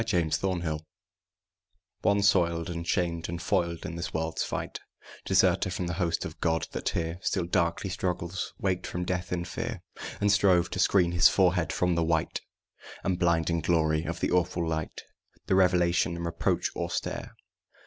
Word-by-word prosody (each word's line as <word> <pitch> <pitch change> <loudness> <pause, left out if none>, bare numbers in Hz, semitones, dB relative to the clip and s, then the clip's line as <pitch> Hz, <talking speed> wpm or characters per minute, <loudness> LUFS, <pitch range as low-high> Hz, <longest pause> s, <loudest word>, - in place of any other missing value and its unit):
THE 90 - 0
IMMORTAL 85 +2 0
WORD 75 -2 -2 1.2
One 100 -1 +3
soiled 85 -3 +2
and 85 0 -5
shamed 85 -2 0
and 85 0 -4
foiled 85 -4 -1
in 80 - -4
this 85 0 -4
world's 80 0 -2
fight, - - -4 0.5
Deserter - - +3
from 90 0 -3
the 85 - -2
host 85 -2 0
of - - -8
God, 80 -1 +1
that - - -2
here 85 +1 -2
Still 95 -3 0
darkly 85 +2 0
struggles, 90 0 -3
waked 95 -2 -1
from 90 0 -3
death 90 0 -2
in 85 -1 -1
fear, - - -5 0.4
And 105 0 +3
strove 95 -4 +4
to - - -3
screen 90 -4 +4
his 85 0 +6
forehead 90 -4 +2
from 90 -1 +1
the 85 -1 +1
white 80 0 0 0.6
And 90 -2 0
blinding 85 -1 +2
glory 80 -2 +2
of 85 0 -4
the - - 0
awful 90 -1 +1
Light, 80 -1 -3 0.4
The - - 0
revelation 90 -2 +3
and 85 0 -4
reproach 85 0 0
austere. - - -3
85 Hz, 170 wpm, -28 LUFS, 85-90 Hz, 1.2 s, his